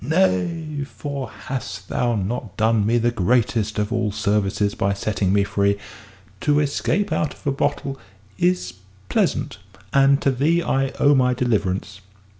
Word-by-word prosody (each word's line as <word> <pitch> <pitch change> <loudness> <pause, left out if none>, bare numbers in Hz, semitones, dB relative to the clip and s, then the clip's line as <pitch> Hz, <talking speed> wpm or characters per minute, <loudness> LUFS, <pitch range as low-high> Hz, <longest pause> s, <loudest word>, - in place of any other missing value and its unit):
"Nay, 155 - 0
for 140 -2 -6
hast 105 -7 -6
thou 120 -1 0
not 105 +1 -3
done 110 -1 +2
me 115 +2 +3
the 120 +1 +2
greatest 110 0 +1
of 105 0 -1
all 115 -3 0
services 105 0 0
by 100 0 0
setting 100 -1 -1
me 100 0 +3
free? 100 0 +1 0.6
To 150 0 +2
escape 155 +6 0
out 155 -2 -1
of - - -22
a 140 - +2
bottle 140 0 -2 0.4
is 90 0 +1 0.4
pleasant. - - 0 0.3
And 140 0 +5
to 140 - +3
thee 155 +7 +2
I 135 -2 +1
owe 145 - +5
my 125 -2 +3
deliverance." 100 -5 -1
120 Hz, 150 wpm, -22 LUFS, 100-140 Hz, 0.6 s, And